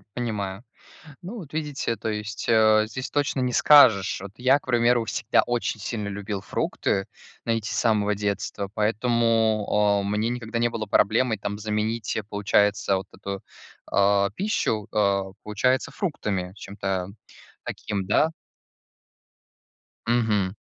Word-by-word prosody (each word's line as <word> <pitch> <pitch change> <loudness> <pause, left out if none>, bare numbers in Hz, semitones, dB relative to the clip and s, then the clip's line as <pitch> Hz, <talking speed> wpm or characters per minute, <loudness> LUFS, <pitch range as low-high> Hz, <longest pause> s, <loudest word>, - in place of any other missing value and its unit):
Понимаю. 105 -4 -3 0.6
Ну 200 +7 -7
вот 160 -10 -10
видите, 150 -6 -2
то 110 +1 -4
есть, 105 +1 -4
а, 110 -1 +5
здесь 125 +5 -6
точно 145 -2 0
не 125 -1 0
скажешь. 120 -8 +6
Вот 100 0 -8
я, 130 +3 +4
к - - -25
примеру, 120 -1 +3
всегда 115 +1 +1
очень 120 -2 -2
сильно 105 0 -4
любил 100 0 -4
фрукты, 95 0 -1 0.4
знаете, 115 -2 -1
с - - -2
самого 105 -3 +2
детства, 100 -1 -3
поэтому, 110 0 +2 0.4
а, - - -4
мне 105 +3 0
никогда 120 -1 -3
не 120 0 +2
было 115 -2 -4
проблемой 110 +3 +2
там 100 +1 -4
заменить, 110 +1 -2
э, 110 - -2
получается, 100 0 +1
вот 95 0 -6
эту, 100 -1 -6 0.5
а, 100 0 +3
пищу, 180 - -1
а, 100 -2 +1
получается, 125 +5 +1
фруктами. 100 - -3
Чем-то 95 -2 -4 0.6
таким, 100 -2 -4
да? 150 +10 +3 1.8
Мгм. 110 -5 +1
110 Hz, 135 wpm, -25 LUFS, 100-120 Hz, 1.8 s, скажешь